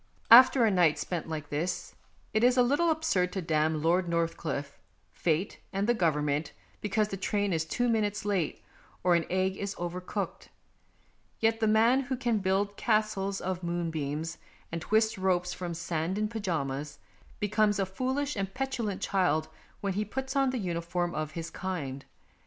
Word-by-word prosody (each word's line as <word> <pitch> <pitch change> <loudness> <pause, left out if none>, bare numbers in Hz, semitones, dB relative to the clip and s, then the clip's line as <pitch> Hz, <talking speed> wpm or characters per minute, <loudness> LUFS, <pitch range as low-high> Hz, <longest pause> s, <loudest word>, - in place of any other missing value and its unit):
After 250 +1 +9
a 220 - +3
night 170 -5 +4
spent 165 0 -3
like 150 -2 -5
this 165 +5 -2 0.4
it 215 +1 +2
is 250 +1 +5
a 250 - +6
little 290 +7 +2
absurd 310 - +1
to 195 - -2
damn 155 -1 +1
Lord 175 +2 +2
Northcliffe, 165 -4 -2 0.3
Fate, 170 +3 -1
and 195 +1 0
the 240 - +3
Government 150 -6 0 0.3
because 210 +1 0
the 195 - -4
train 200 0 0
is 160 -1 0
two 245 +9 0
minutes 210 -3 0
late, 195 -6 -1 0.4
or 180 0 +4
an 170 -1 +2
egg 190 +1 0
is 200 0 -4
over 175 +1 -4
cooked. 180 - -4 0.9
Yet 225 0 +2
the 220 - +2
man 225 +4 +5
who 265 -1 -2
can 240 -4 +1
build 200 +1 0
castles 215 -3 0
of 185 -1 -3
moonbeams 165 -3 -3 0.3
and 165 0 -3
twist 220 +2 +2
ropes 180 -2 +1
from 175 -2 -5
sand 170 +1 -2
in 215 0 0
pyjamas, 150 -9 -3 0.4
be 210 - 0
comes 210 -1 +3
a 195 - +1
foolish 260 +9 -2
and 195 -2 -2
petulant 245 -7 -2
child 180 -5 +1 0.3
when 200 -1 -1
he 205 +3 0
puts 265 +6 -4
on 270 -1 +3
the 255 - -2
uniform 175 -2 -2
of 155 0 -3
his 165 0 -5
kind. 145 -8 -4
190 Hz, 170 wpm, -29 LUFS, 165-215 Hz, 0.9 s, After